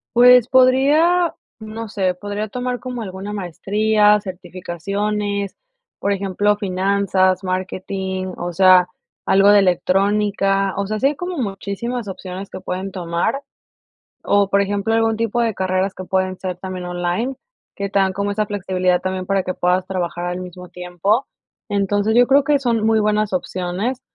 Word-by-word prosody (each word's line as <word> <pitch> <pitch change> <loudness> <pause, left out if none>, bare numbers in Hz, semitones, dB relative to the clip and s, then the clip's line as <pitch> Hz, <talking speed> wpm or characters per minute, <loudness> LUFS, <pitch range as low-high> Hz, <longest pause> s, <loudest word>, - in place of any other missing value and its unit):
Pues 245 0 +7
podría, 290 +7 +4 0.2
no 220 +1 -7
sé, 190 -3 0
podría 205 +3 -4
tomar 250 +3 -3
como 250 -2 -6
alguna 195 0 -6
maestría, 210 +3 +2
certificaciones, 200 +3 -4 0.4
por 200 - -1
ejemplo, 200 +1 +1
finanzas, 190 -1 +1
marketing, 185 0 -3
o 175 0 -4
sea, 185 0 +6 0.4
algo 195 +1 +5
de 205 - +7
electrónica, 195 +1 +1
o 200 - -1
sea, 215 +1 -3
sí 270 - +3
hay 295 - -1
como 355 +1 -5
muchísimas 210 +2 -4
opciones 190 0 -7
que - - -7
pueden 190 +2 -4
tomar. 180 +9 -2 0.8
O, 200 -1 +2
por 200 0 +3
ejemplo, 205 +2 -1
algún 225 -1 +2
tipo 230 +1 0
de 230 -2 +1
carreras 190 0 -1
que 185 - -8
pueden 185 0 -1
ser 185 -2 -4
también 185 -1 -6
online, 180 +9 -2 0.4
que 200 0 -3
te 200 - +1
dan 190 -1 +2
como 200 +1 -2
esa 210 +1 0
flexibilidad 185 -3 0
también, 185 0 -3
para 195 -1 0
que 185 - -3
puedas 180 +1 +1
trabajar 175 -2 -3
al 180 0 -3
mismo 180 0 -9
tiempo. 180 +7 -1 0.4
Entonces, 205 +2 +1
yo 245 +1 +6
creo 275 +1 +5
que 290 -2 +3
son 230 -4 0
muy 220 0 +3
buenas 210 -1 0
opciones, 185 +7 -2
200 Hz, 155 wpm, -20 LUFS, 185-215 Hz, 0.8 s, Pues